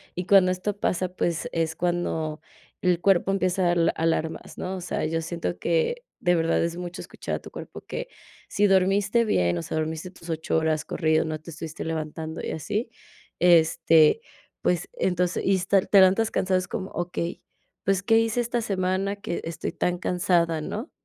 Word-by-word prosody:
Y 180 - -3
cuando 190 -1 +6
esto 185 +3 -2
pasa, 185 -2 -1
pues, 170 -2 -2
es 160 -1 -1
cuando 165 -3 -1 0.4
el 180 -2 +2
cuerpo 195 -1 +3
empieza 185 -2 +2
al 170 -1 +3
alarmas, 160 0 -2
¿no? 190 +1 -4
O - - -6
sea, 175 - -2
yo 165 +1 -1
siento 160 - -4
que 170 - 0 0.2
de 175 -1 +2
verdad 165 -1 +2
es 170 0 -2
mucho 180 +1 -6
escuchar - - -5
a - - -4
tu - - -12
cuerpo - - -9
que - - -5 0.4
si 205 - +2
dormiste 195 +4 +3
bien, 85 - +1
o - - -3
sea, 155 - -4
dormiste 160 +3 -3
tus 170 -2 -15
8 160 0 -1
horas, 160 -1 0
corrido, 160 -2 +1
no 155 -1 -4
te 160 +2 -11
estuviste 160 0 -6
levantando 160 0 -4
y - - -3
así, 210 +9 -3 0.5
este, 165 - +5 0.4
pues, 180 -1 0
entonces, 180 -1 0
y 195 - +4
esta, 190 +1 +3
te 200 +1 +4
levantas 195 +4 +5
cansado 185 0 +1
es 185 -1 -2
como 190 -1 -4
okey, 175 0 -4 0.4
¿pues, 195 -1 +1
qué 225 +4 +4
hice 225 +1 +2
esta 240 0 -1
semana, 195 0 -1
que 185 -4 -4
estoy 165 0 -4
tan 180 0 -1
cansada, 175 -4 +1
no? 220 - -5
175 Hz, 180 wpm, -25 LUFS, 165-195 Hz, 0.5 s, cuando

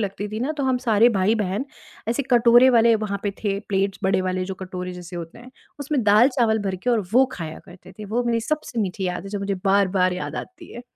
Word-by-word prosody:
लगती 205 0 -3
थी 215 +2 -5
ना, 270 +5 -1
तो 290 -2 -4
हम 260 -1 +1
सारे 225 +2 +5
भाई-बहन 205 +2 0 0.4
ऐसे 240 +5 0
कटोरे 240 +1 +6
वाले 230 -1 +5
वहाँ 200 -1 -3
पे 205 - -1
थे, 200 -1 0
प्लेट्स 195 0 0
बड़े 190 0 +2
वाले 185 0 -2
जो 190 - -5
कटोरे 180 -1 -6
जैसे 180 0 -9
होते 170 +5 -8
हैं, 245 +2 -13 0.3
उसमें 285 -2 -1
दाल-चावल 220 +1 +4
भर 185 - -2
के 250 - +2
और 235 -2 +2
वो 260 +2 +6
खाया 160 -2 -6
करते 185 0 -15
थे, 215 - -10
वो 225 +4 -1
मेरी 230 -1 0
सबसे 245 -2 -3
मीठी 190 -1 -3
याद 180 -1 -3
है, - - -7
जो 205 - -3
मुझे 200 0 -2
बार-बार 195 -2 +2
याद 180 - -5
आती 365 -2 -9
है। 240 - -8
205 Hz, 230 wpm, -23 LUFS, 190-240 Hz, 0.4 s, कटोरे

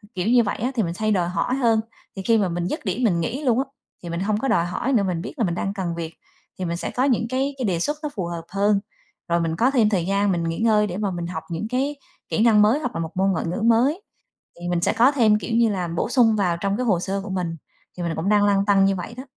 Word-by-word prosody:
kiểu 185 +2 -2
như 240 0 +5
vậy 205 - -2
á 245 +4 -1
thì 225 - +1
mình 170 -2 -2
hay 215 0 +1
đòi 175 -4 +1
hỏi 245 +7 -1
hơn, 230 -4 +3 0.4
thì 195 - -5
khi 230 +1 +3
mà 195 -4 +1
mình 175 +1 -2
dứt 300 - -4
điểm 205 +6 -1
mình 185 -7 +2
nghỉ 260 - -3
luôn 245 -2 +2
á, 270 - 0 0.4
thì 175 - -6
mình 170 0 -3
hông 205 +2 0
có 270 - -1
đòi 170 -9 +2
hỏi 240 +9 -2
nữa, 215 - +3
mình 180 -3 -1
biết - - -7
là 235 - +1
mình 170 - -1
đang 195 +2 -2
cần 180 -4 -3
việc 165 -1 -5 0.5
thì 185 - -2
mình 170 0 -2
sẽ - - -4
có 250 - 0
những 245 -4 +1
cái 270 +2 -1
cái 255 - -2
đề 180 -5 0
xuất 295 - -1
nó 300 - -1
phù 190 -5 -2
hợp 170 -1 -5
hơn, 200 +1 +2 0.5
rồi 170 0 +2
mình 165 -1 -1
có 245 +8 +2
thêm 230 -6 +3
thời 185 -5 0
gian 200 +1 +1
mình 170 -2 -1
nghỉ 165 +2 -2
ngơi 215 -2 +3
để 180 +1 -5
mà 205 -2 -1
mình 175 -1 -4
học 160 -3 -5
những 170 +6 -3
cái 270 +4 -1 0.3
kỹ 220 - +1
năng 220 -3 +5
mới, 220 +7 +4
hoặc 250 -5 -4
là - - -2
một 160 -1 -4
môn 190 +1 +2
ngoại 185 - -1
ngữ 175 +6 -3
mới. 240 - +3 0.6
Thì 175 - -4
mình 175 -1 0
sẽ - - +1
có 240 +5 +4
thêm 220 -6 +4
kiểu 225 +1 -2
như 235 -1 +4
là, 180 -3 -2
bổ 170 +5 -2
sung 235 -4 +4
vào 180 -4 +1
trong 200 0 0
cái 250 +1 -2
hồ 185 -6 +2
sơ 195 +2 -2
của 205 - -7
mình, 180 -3 -2 0.4
thì 180 - -5
mình 170 - -1
là - - -2
cũng 160 +4 -2
đang 205 -1 +4
lăn 200 -1 +3
tăn 195 -1 +4
như 195 0 +2
vậy 180 +6 -6
đó. 255 - -6
200 Hz, 305 wpm, -23 LUFS, 175-230 Hz, 0.6 s, như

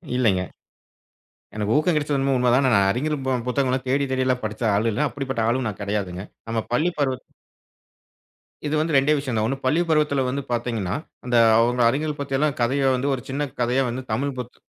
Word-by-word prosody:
இல்லைங்க. 100 -8 +2 1.1
எனக்கு 105 0 -1
ஊக்கம் 160 +3 +2
கிடைச்சது 150 -1 0
என்னமோ 135 0 +1
உண்மை 125 0 +3
தான். 135 +2 +3
நான் 100 -1 +4
அறிஞர் 150 +7 -1
பு - - +1 0.2
புத்தகங்கள்லாம் 130 0 0
தேடித் 135 +1 +1
தேடி 130 0 +1
எல்லாம் 125 -1 0
படிச்ச 110 +2 -5
ஆளுல்ல. 115 +7 +1
அப்படிப்பட்ட 130 -5 -2
ஆளும் 125 +1 0
நான் 105 - -7
கிடையாதுங்க. 100 -2 -3 0.2
நம்ம 115 0 0
பள்ளிப்பருவத்து 140 -2 -1 1.4
இது 150 - 0
வந்து 155 -1 0
2ஏ 135 +3 +4
விஷயம் 130 -5 -2
தான். 130 +6 -1
பள்ளிப்பருவத்துல 150 -2 +2
வந்து 140 +2 -2
பாத்தீங்கன்னா, 115 -6 -1 0.3
அந்த 125 -1 0 0.2
அவுங்க 120 +1 +2
அறிஞர்கள் 150 +3 -2
பத்தி 140 -1 -2
எல்லாம் 150 0 +1
கதையா 135 +3 +2
வந்து 130 +2 -2
ஒரு 130 - -3
சின்னக் 140 0 -3
கதையா 125 +3 +2
வந்து 125 +2 -4
தமிழ் 140 +5 -1
புத் 125 -1 -7
130 Hz, 175 wpm, -23 LUFS, 120-140 Hz, 1.4 s, நான்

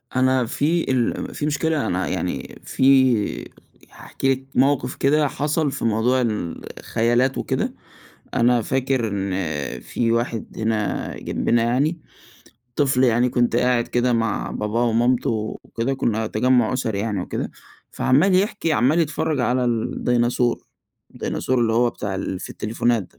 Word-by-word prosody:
أنا 130 -1 +3
في 150 +6 0
ال 125 -3 -1
في 145 - -2
مشكلة 150 0 0
أنا 90 +1 -1
يعني - - -4
في 130 -5 +2 0.4
هاحكي 135 - -2
لِك 130 0 -7
موقف 130 -1 +2
كده 150 +2 +2
حصل 150 +1 -1
في 120 - -4
موضوع 115 +4 +2
الخيالات 115 +4 -1
وكده، - - -2 0.6
أنا 120 -1 +3
فاكر 130 -2 0
إن 100 -1 -2 0.5
في 115 -1 -1
واحد 115 -1 -1
هنا 110 -1 -1
جنبنا 115 0 0
يعني 140 +8 +1 0.8
طفل 135 -3 +3
يعني 120 0 +3
كنت 120 -1 +1
قاعد 125 -1 +2
كده 125 0 +1
مع 115 -2 -1
باباه 105 +3 -1
ومامته 120 +2 +2 0.3
وكده، 120 +4 -2
كنا 110 -4 -1
تجمُّع 120 +2 +2
أسري 110 -5 -1
يعني 105 -2 -2
وكده، - - -4 0.4
فعمّال 165 +9 +3
يحكي 185 -4 +1
عمّال 145 +5 +3
يتفرج 155 -1 -1
على 125 +1 +1
الديناصور، 120 +1 0 0.5
الديناصور 130 0 -2
اللي 115 -2 +2
هو 120 +1 +3
بتاع 100 -4 -5
ال 95 0 -4
في - - -7
التليفونات 115 +1 0
ده، 90 - -18
125 Hz, 135 wpm, -22 LUFS, 115-135 Hz, 0.8 s, أنا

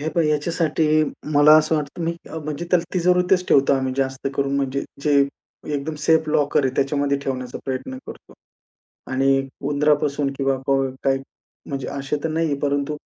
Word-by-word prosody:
हे 155 - -2
पहा 170 +2 +1
ह्याच्यासाठी 155 0 +1 0.3
मला 145 +1 +7
असं 155 +1 +1
वाटतं, 150 +3 -4
मी 170 +1 -2
अ, 160 - -5
म्हणजे 150 +1 -5
त्याला 175 -2 +3
तिजोरीतच 180 +1 +2
ठेवतो 140 0 +4
आम्ही 130 -1 -1
जास्त 135 0 -1
करून. 140 0 0
म्हणजे 140 0 -1 0.2
जे 145 -1 +3 0.6
एकदम 145 +3 -3
सेफ 160 +1 +2
लॉकर 145 -1 +2
आहे 130 0 0
त्याच्यामध्ये 140 0 +1
ठेवण्याचा 130 -2 -4
प्रयत्न 135 - -4
करतो. - - -11 0.8
आणि 135 +1 +2 0.2
उंदरापासून 145 -1 +1
किंवा 135 -1 +1 0.5
काही 135 -1 +2 0.5
म्हणजे 135 -1 -4
असे 140 +1 -3
तर 160 - 0
नाही 165 +1 0
आहे, 145 - 0
परंतु 145 +1 -1
145 Hz, 160 wpm, -22 LUFS, 135-155 Hz, 0.8 s, मला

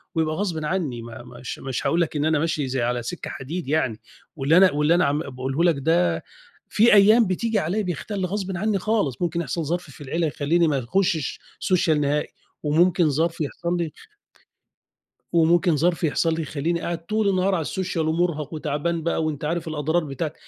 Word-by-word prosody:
ويبقى 155 -1 0
غصبٍ 170 -6 -2
عنّي 150 -9 -2
ما 115 0 -9
مش 120 0 -8
مش 135 -2 -4
هاقول 170 +1 +2
لك 160 - -1
إن 145 0 0
أنا 155 -2 +2
ماشي 155 -3 -1
زي 130 0 -1
على 120 0 -1
سِكّة 175 +8 -5
حديد 155 +4 -5
يعني، 140 -7 0 0.4
واللي 145 +3 +3
أنا 185 0 +7
واللي 150 +3 +3
أنا 180 - +3
عم 145 +2 +1
باقوله 135 +2 -2
لك 170 -2 +4
ده، 110 - +1 0.5
في 225 +3 +5
أيام 215 +2 +6
بتيجي 220 +4 0
عليّا 190 +5 -1
بيَختَل 195 +1 -3
غصبٍ 190 0 -3
عنّي 210 +2 +1
خالص، 185 - 0
ممكن 170 -1 0
يحصل 165 +1 -3
ظرف 170 +1 -3
في 145 - -15
العيلة 160 +4 -1
يخلّيني 160 +3 +1
ما 145 -3 +1
يخُشّش 160 +3 0 0.2
سوشيال 160 -5 +2
نهائي 145 +1 0 0.4
وممكن 170 +2 +3
ظرف 165 +3 0
يحصل 170 +4 -2
لي 170 -3 -2 1.4
وممكن 170 +1 +4
ظرف 170 +4 +1
يحصل 165 +1 +1
لي 165 - -2
يخلّيني 160 +3 -2
قاعد 170 -1 -4
طول 215 +1 +1
النهار 190 0 +2
على 165 - 0
السوشيال 175 -1 -2
ومُرهق 160 -2 -1
وتعبان 155 +2 -2
بقى 165 0 0
وأنت 155 -2 -3
عارف 170 +2 -2
الأضرار 160 +2 0
بتاعة 150 +2 -4
160 Hz, 185 wpm, -23 LUFS, 145-175 Hz, 1.4 s, أنا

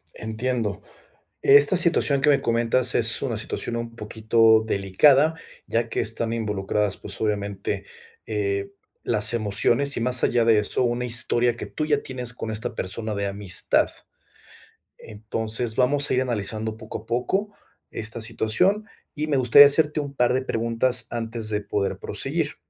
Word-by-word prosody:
Entiendo. 110 -1 -3 0.6
Esta 145 +6 +6
situación 165 -5 +2
que 150 - +4
me 140 - +4
comentas, 120 +2 +1
es 115 -1 +1
una 120 -5 -2
situación 115 +2 -4
un 115 0 -5
poquito 110 0 +3
delicada, 135 +11 +3 0.3
ya 115 0 0
que - - -2
están 115 +1 -3
involucradas, 105 -2 -1
pues, - - -7
obviamente, 100 -2 -2 0.4
eh, 100 -2 -2 0.3
las 105 0 +1
emociones 115 +6 +1
y - - -2
más 125 0 0
allá 120 -1 +3
de 115 -2 +5
eso, 105 +4 0
una 120 0 -1
historia 120 0 +1
que 115 - -7
tú 155 - -3
ya 145 -2 +1
tienes 125 -2 -6
con 115 - -6
esta 110 0 -3
persona 110 +4 -4
de 100 -1 -2
amistad. 100 -3 0 1.1
Entonces, 110 +2 -4
vamos 140 +4 +1
a - - +3
ir 130 - +2
analizando 110 -2 -3
poco 110 -1 -7
a 110 - -17
poco 190 - -1 0.4
esta 110 +1 -5
situación 115 - 0 0.3
y 150 - -2
me 145 -3 0
gustaría 130 +3 +8
hacerte 150 +1 +1
un 140 -1 -5
par 125 -2 +2
de 130 - 0
preguntas 115 +1 -1
antes 115 -1 -4
de 105 -1 -1
poder 100 -1 -2
proseguir. - - -3
115 Hz, 155 wpm, -24 LUFS, 110-130 Hz, 1.1 s, gustaría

